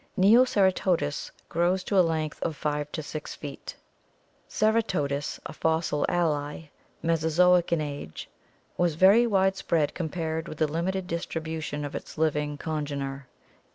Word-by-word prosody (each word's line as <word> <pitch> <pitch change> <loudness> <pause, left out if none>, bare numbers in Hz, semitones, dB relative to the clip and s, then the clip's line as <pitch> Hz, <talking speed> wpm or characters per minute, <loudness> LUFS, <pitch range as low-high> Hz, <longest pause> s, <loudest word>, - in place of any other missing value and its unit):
Neoceratodus 190 - +3 0.2
grows 175 +2 +1
to 200 - -2
a - - +9
length 160 -3 -1
of 160 - -2
5 150 0 -2
to 155 - -3
6 150 0 -6
feet. 145 -2 -8 0.7
Ceratodus, 185 -11 0
a - - -6
fossil 160 -1 0
ally, 150 -2 -1 0.3
Mesozoic 165 +2 +3
in 170 -2 +2
age, 145 - -6 0.5
was 175 -3 +1
very 200 +8 +6
wide 190 -3 +2
spread 155 -4 0
compared 160 -1 -3
with 155 - -7
the 155 - +3
limited 175 +5 -2
distribution 160 -3 -4
of 145 - -6
its - - -7
living 150 -2 0
congener. 140 -3 -4
160 Hz, 130 wpm, -27 LUFS, 150-180 Hz, 0.7 s, a